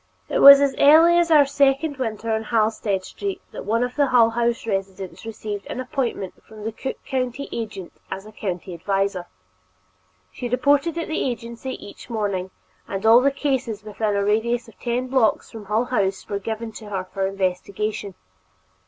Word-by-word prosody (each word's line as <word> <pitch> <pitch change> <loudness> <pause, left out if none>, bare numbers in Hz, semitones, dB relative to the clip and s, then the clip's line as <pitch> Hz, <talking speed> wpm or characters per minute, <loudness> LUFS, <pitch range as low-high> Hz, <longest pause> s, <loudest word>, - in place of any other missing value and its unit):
It - - 0
was 280 0 +11
as 280 -1 +2
early 325 +4 +7
as 340 -1 +2
our 300 -3 +7
second 280 +1 +1
winter 225 -3 -3
on 220 0 0
Halsted 215 -3 0
Street 395 - -5
that - - -8
one 230 +4 +1
of 245 0 -3
the 285 -1 +3
Hull 235 -3 +5
House 235 0 0
residents 195 -2 -4
received 210 -2 -6
an - - -5
appointment 250 -7 -3
from 215 -1 -12
the 225 - -2
Cook 265 +4 -5
County 260 0 -2
agent 210 -6 -6 0.2
as 195 +1 -6
a 215 - -11
county 185 -3 -5
visitor. 195 0 -1 1.0
She 245 - -5
reported 285 +6 +2
at 335 - -3
the 315 - -1
agency 235 +1 -4
each 205 - -11
morning, 200 -5 -2 0.4
and 195 +2 -4
all 230 +2 +7
the 280 - +4
cases 265 -7 -2
within 210 0 -2
a 200 0 +1
radius 230 +3 0
of 225 - -18
ten 245 +1 -1
blocks 255 -4 +1
from 220 -3 -9
Hull 215 +4 0
House 195 -6 -1
were 200 -1 -3
given 225 +2 -5
to 215 -1 -10
her 190 -2 -2
for 190 +1 -3
investigation. 195 +1 -3
225 Hz, 180 wpm, -23 LUFS, 200-255 Hz, 1.0 s, was